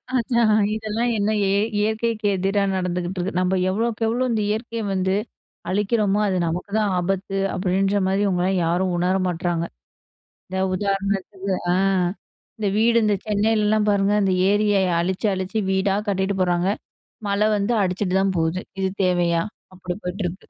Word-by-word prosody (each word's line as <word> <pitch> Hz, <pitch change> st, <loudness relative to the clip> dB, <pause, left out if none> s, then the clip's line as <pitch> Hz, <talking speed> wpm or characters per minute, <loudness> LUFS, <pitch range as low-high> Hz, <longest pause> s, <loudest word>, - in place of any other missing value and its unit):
அதான் 235 Hz, -2 st, +2 dB, 0.2 s
இதெல்லாம் 220 Hz, +2 st, -1 dB
என்ன 205 Hz, +1 st, +1 dB
இய -, -, +2 dB, 0.3 s
இயற்கைக்கு 220 Hz, +1 st, -1 dB
எதிரா 195 Hz, +2 st, +1 dB
நடந்துகிட்ருக்கு 180 Hz, 0 st, -2 dB
"நம்ப 185 Hz, +1 st, +1 dB
எவ்ளோக்கு 225 Hz, +4 st, -1 dB
எவ்ளோ, 240 Hz, +3 st, 0 dB
இந்த 220 Hz, -, 0 dB
இயற்கைய 230 Hz, +1 st, -3 dB
வந்து 190 Hz, 0 st, 0 dB, 0.6 s
அழிக்கிறோமோ, 205 Hz, +1 st, +1 dB
அது 185 Hz, -2 st, 0 dB
நமக்கு 175 Hz, +5 st, -3 dB
தான் 210 Hz, -2 st, +1 dB
ஆபத்து" 195 Hz, +2 st, -1 dB, 0.2 s
அப்படின்ற 195 Hz, +2 st, +1 dB
மாரி 195 Hz, +2 st, +1 dB
இவங்களலாம் 185 Hz, -1 st, +1 dB
யாரும் 180 Hz, +2 st, +1 dB
உணர 180 Hz, +2 st, +1 dB
மாட்றாங்க. 175 Hz, -1 st, -1 dB, 0.8 s
இந்த 190 Hz, 0 st, -3 dB, 0.2 s
உதாரணத்துக்கு 195 Hz, 0 st, -2 dB, 0.2 s
அ! -, -, +2 dB, 0.8 s
இந்த 210 Hz, -2 st, 0 dB
வீடு 230 Hz, +2 st, +4 dB
இந்த 210 Hz, -1 st, +2 dB
சென்னையிலலா 215 Hz, 0 st, +2 dB
பாருங்க! 200 Hz, 0 st, +2 dB
இந்த 190 Hz, -, +2 dB, 0.2 s
ஏரிய 205 Hz, 0 st, +2 dB, 0.3 s
அழிச்சு 190 Hz, +4 st, -1 dB
அழிச்சு 190 Hz, +4 st, -2 dB
வீடா 190 Hz, +1 st, +1 dB
கட்டிட்டு 190 Hz, 0 st, 0 dB
போறாங்க. 175 Hz, 0 st, +1 dB, 0.6 s
மழ 200 Hz, +1 st, 0 dB, 0.2 s
வந்து 205 Hz, +4 st, 0 dB
அடிச்சிட்டு 185 Hz, 0 st, -1 dB
தான் 195 Hz, -1 st, +1 dB
போது. 160 Hz, +2 st, 0 dB, 0.2 s
இது 190 Hz, -, +1 dB, 0.2 s
தேவையா? 175 Hz, -2 st, +2 dB, 0.3 s
அப்படி 180 Hz, -1 st, -5 dB
போய்ட்டிருக்கு. 180 Hz, 0 st, -4 dB
195 Hz, 140 wpm, -22 LUFS, 185-210 Hz, 0.8 s, வீடு